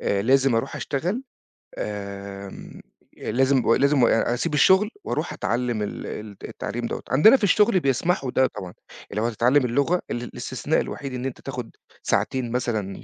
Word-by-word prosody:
آآ 100 0 0
لازم 135 +1 +3
أروح 115 +4 -1
أشتغل، 180 - -2 0.6
آمم 100 -1 -7 0.4
لازم 130 -2 +2
لازم 140 -1 +3
أ 115 +1 +2
أسيب 150 +6 -2
الشغل 190 +8 +5
وأروح - - -2
أتعلّم 120 -2 -1
ال 105 - -4
ال 105 -2 -7
التعليم 120 0 -5
دوّة. - - -5
عندنا 215 - +7
في 220 - -9
الشغل 205 0 +4
بيسمحوا 135 -1 0
ده 130 0 +3
طبعًا، 90 -2 -8 0.4
اللي 105 +2 -2
لو 115 - +1
هتتعلّم 125 +4 +3
اللغة، 140 +9 +1
ال 120 - -3
الاستثناء - - -2
الوحيد 140 -2 -6
إن 125 0 -4
أنت 135 - -5
تاخد 125 -4 -6 0.3
ساعتين 130 -3 0
مثلًا 110 -6 -2
125 Hz, 155 wpm, -24 LUFS, 115-140 Hz, 0.6 s, عندنا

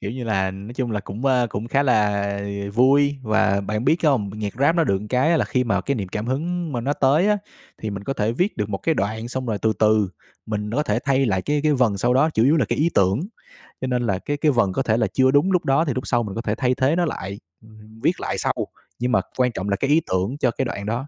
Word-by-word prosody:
Kiểu 100 - -4
như 125 0 -5
là, 95 -4 0
nói 100 +5 -9
chung 125 -3 -2
là 105 - -1
cũng, 105 +7 -5
a, 125 -2 +3
cũng 110 +1 -5
khá 140 +3 +2
là 100 -5 +1 0.3
vui. 140 +3 +4
Và 110 -3 +2
bạn 105 +4 -3
biết 160 - +4
không, 125 -10 +2
nhạc 105 -2 -4
rap 145 +5 +3
nó 165 - +3
được 100 -3 0
cái 150 +6 +2
là - - +2
khi 125 -1 0
mà 110 -4 +1
cái 140 - -1
niềm 100 -5 -4
cảm 105 +4 -4
hứng 165 +4 -2
mà 120 - -2
nó 140 +4 -1
tới 145 +9 +3
á, 210 -1 +2 0.4
thì 110 - -2
mình 100 0 -6
có 135 - -1
thể 110 -2 -1
viết 180 - -1
được 105 -2 -2
một 100 -2 -3
cái 160 - 0
đoạn. 110 +2 -2
Xong 130 0 -4
rồi 110 -3 -1
từ 110 0 +3
từ 110 -2 +3 0.4
mình 105 -1 -3
đó 140 +6 0
thể - - 0
thay 135 -1 +2
lại 95 -3 0
cái 145 0 0
cái 155 -1 +3
vần 120 -7 +2
sau 120 +5 +2
đó, 155 +5 +3
chủ 115 -4 +2
yếu 150 +5 +4
là 135 - +2
cái - - -1
ý 165 +3 +2
tưởng. 95 +4 +3 0.6
Cho 130 - -2
nên 125 -1 0
là 95 -3 0
cái 145 +7 -3
cái 150 +1 +2
vần 120 -7 +1
có 135 - 0
thể 110 0 +1
là 110 - +2
chưa 130 0 +4
đúng 145 +7 +3
lúc 180 -2 +1
đó, 140 +5 +3
thì 140 - -1
lúc 130 - -4
sau 120 -1 +1
mình 100 -3 -6
có 115 - -2
thể 105 -1 -2
thay 125 0 +1
thế 135 +4 +2
nó 175 0 +2
lại, 100 -8 -5 0.2
ừm, 110 0 -16
viết - - +1
lại - - -3
sau. - - 0 0.5
Nhưng 125 +1 0
mà - - +3 0.2
quan 125 -1 +2
trọng 100 -2 -4
là 100 - +2
cái 140 +7 -2
ý 155 +3 +4
tưởng 95 +9 0
cho 130 -4 +1
cái 135 - -2
đoạn 100 -4 -5
đó. 120 +6 -3
120 Hz, 285 wpm, -22 LUFS, 105-140 Hz, 0.6 s, vui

